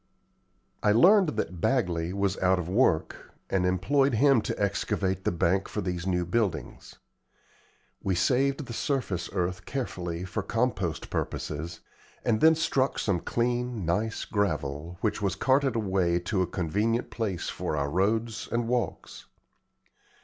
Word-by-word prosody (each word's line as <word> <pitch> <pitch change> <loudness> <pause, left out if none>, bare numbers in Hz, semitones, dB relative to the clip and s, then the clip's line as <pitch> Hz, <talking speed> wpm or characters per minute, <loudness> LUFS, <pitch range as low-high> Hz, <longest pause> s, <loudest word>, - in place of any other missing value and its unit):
I 105 - +4
learned 180 - +5
that 90 -3 -3
Bagley 90 -10 +1
was 100 0 0
out 95 0 +3
of 90 -2 -3
work, 95 -5 0 0.2
and 90 -1 +2
employed 130 +9 +2
him 135 0 +5
to - - -4
excavate 95 -1 -1
the - - +2
bank 90 +3 +1
for - - -4
these 90 0 -3
new 90 -2 +1
buildings. 85 - -2 1.1
We 95 -2 0
saved 135 - +1
the 115 - -7
surface 115 - -2
earth 90 +1 -2
carefully 90 -10 -4
for 90 - -3
compost 105 -9 -1
purposes, 80 +3 -4 0.4
and 110 -2 +2
then 160 0 +7
struck 140 -4 +1
some 100 -5 0
clean, 120 -1 -1
nice 105 +7 -1
gravel, 85 -5 -2
which 105 -1 0
was 95 -2 0
carted 130 +3 +2
away 95 -5 +1
to 95 +2 -1
a 90 - +1
convenient 105 +8 -1
place 100 -7 -2
for 75 - -3
our 70 0 -1
roads 110 +5 0
and 115 0 0
walks. 120 0 -3
100 Hz, 140 wpm, -28 LUFS, 90-120 Hz, 1.1 s, then